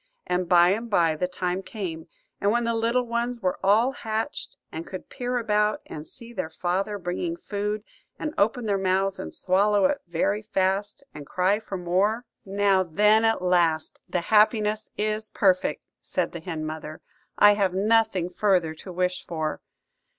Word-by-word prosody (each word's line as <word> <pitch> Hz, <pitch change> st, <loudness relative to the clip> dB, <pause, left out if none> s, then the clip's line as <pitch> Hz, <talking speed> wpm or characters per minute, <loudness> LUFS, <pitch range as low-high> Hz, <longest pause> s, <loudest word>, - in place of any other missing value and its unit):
And 180 Hz, -1 st, -1 dB
by 175 Hz, 0 st, +6 dB
and 225 Hz, +5 st, -1 dB
by 165 Hz, -6 st, +3 dB
the 180 Hz, +4 st, -1 dB
time 180 Hz, 0 st, -2 dB
came; 185 Hz, -5 st, -6 dB, 0.3 s
and 200 Hz, -, +2 dB
when 240 Hz, +1 st, +1 dB
the 230 Hz, 0 st, 0 dB
little 230 Hz, +2 st, +1 dB
ones 235 Hz, +1 st, -2 dB
were 185 Hz, -4 st, -1 dB
all 215 Hz, +7 st, +4 dB
hatched, 220 Hz, -3 st, -4 dB
and 160 Hz, +1 st, -6 dB
could 185 Hz, -, -8 dB
peer 245 Hz, 0 st, -2 dB
about 210 Hz, -2 st, +1 dB
and 150 Hz, 0 st, -8 dB
see 235 Hz, -2 st, -12 dB
their 185 Hz, -7 st, -3 dB
father 185 Hz, +5 st, -2 dB
bringing 195 Hz, -, -3 dB
food, 210 Hz, -, -3 dB, 0.3 s
and 305 Hz, 0 st, -4 dB
open 225 Hz, +4 st, +1 dB
their 200 Hz, -2 st, +1 dB
mouths 190 Hz, +1 st, +1 dB
and -, -, -5 dB
swallow 200 Hz, +4 st, +2 dB
it 285 Hz, 0 st, +1 dB
very 175 Hz, +5 st, 0 dB
fast, 205 Hz, +3 st, -1 dB
and 145 Hz, -2 st, -9 dB
cry 185 Hz, +3 st, +1 dB
for 210 Hz, -3 st, -6 dB
more,– 195 Hz, +7 st, +1 dB, 0.2 s
"Now 195 Hz, -1 st, +2 dB
then, 210 Hz, +6 st, +3 dB
at 225 Hz, -4 st, +2 dB
last 170 Hz, -3 st, +1 dB
the 175 Hz, -, 0 dB
happiness 215 Hz, +2 st, +2 dB
is 215 Hz, +1 st, -1 dB
perfect," 185 Hz, -2 st, +1 dB, 0.2 s
said -, -, -2 dB
the 170 Hz, -, -6 dB
hen 160 Hz, -2 st, -5 dB
mother; 155 Hz, 0 st, -6 dB, 0.4 s
"I 205 Hz, -, +8 dB
have 195 Hz, -3 st, 0 dB
nothing 205 Hz, -3 st, +2 dB
further 180 Hz, -4 st, +1 dB
to 185 Hz, +4 st, -10 dB
wish 180 Hz, 0 st, -1 dB
for." 160 Hz, -2 st, -3 dB
200 Hz, 170 wpm, -25 LUFS, 180-220 Hz, 0.4 s, I